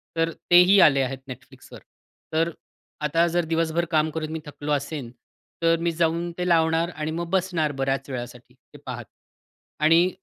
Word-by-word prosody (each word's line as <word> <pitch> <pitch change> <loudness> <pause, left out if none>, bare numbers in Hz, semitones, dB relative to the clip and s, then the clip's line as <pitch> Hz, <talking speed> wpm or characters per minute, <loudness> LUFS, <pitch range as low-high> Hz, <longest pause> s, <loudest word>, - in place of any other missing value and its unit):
तर 165 0 +1 0.2
तेही 180 +3 +7
आले 140 -2 +4
आहेत 135 0 -3
Netflixवर. - - -12 0.5
तर 165 +1 +2
अ, - - -8 0.5
आता 165 +3 +2
जर 170 0 0
दिवसभर 165 +1 0
काम 155 0 +2
करून 155 -1 -3
मी 160 - -4
थकलो 150 0 -6
असेन, 145 -3 -2 0.5
तर 165 0 +4
मी 170 0 +1
जाऊन 170 +1 0
ते 180 0 -2
लावणार 165 0 +2
आणि 155 0 -4
मग 170 +1 -3
बसणार 180 -5 0
बऱ्याच 135 +1 -1
वेळासाठी, 120 -2 -7
ते - - -19
पाहत. - - -6 0.7
आणि 165 +4 +5
160 Hz, 165 wpm, -24 LUFS, 150-170 Hz, 0.7 s, तेही